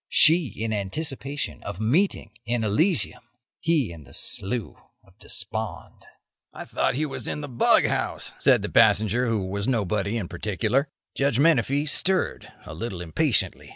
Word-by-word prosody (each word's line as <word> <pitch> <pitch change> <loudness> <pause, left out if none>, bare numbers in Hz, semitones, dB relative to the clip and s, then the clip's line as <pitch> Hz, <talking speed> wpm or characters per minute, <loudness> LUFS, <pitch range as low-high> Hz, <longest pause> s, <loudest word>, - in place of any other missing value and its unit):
She 160 0 +6
in 110 +1 -4
anticipation 135 - -3
of 90 - -7
a - - -3
meeting 140 - +1
in 120 -1 -1
Elysium; 155 - +1 0.4
he 150 - +1
in 80 -3 -12
the 65 - -12
Slough 110 +2 -2 0.2
of - - -24
Despond." - - -5 0.4
"I - - -9
thought - - 0
he 155 +3 0
was 140 - -5
in 150 - -3
the 145 - -5
bughouse," 120 -3 +1
said - - +4
the - - -3
passenger 115 +4 +4
who 110 -4 0
was 100 +2 -3
nobody 105 -3 0
in 100 -6 -3
particular. 110 - -1 0.3
Judge 140 -3 +1
Menefee 145 -1 +3
stirred, 185 +5 0
a - - -8
little 95 +3 -5
impatiently. 80 -3 0
120 Hz, 155 wpm, -25 LUFS, 100-145 Hz, 0.4 s, She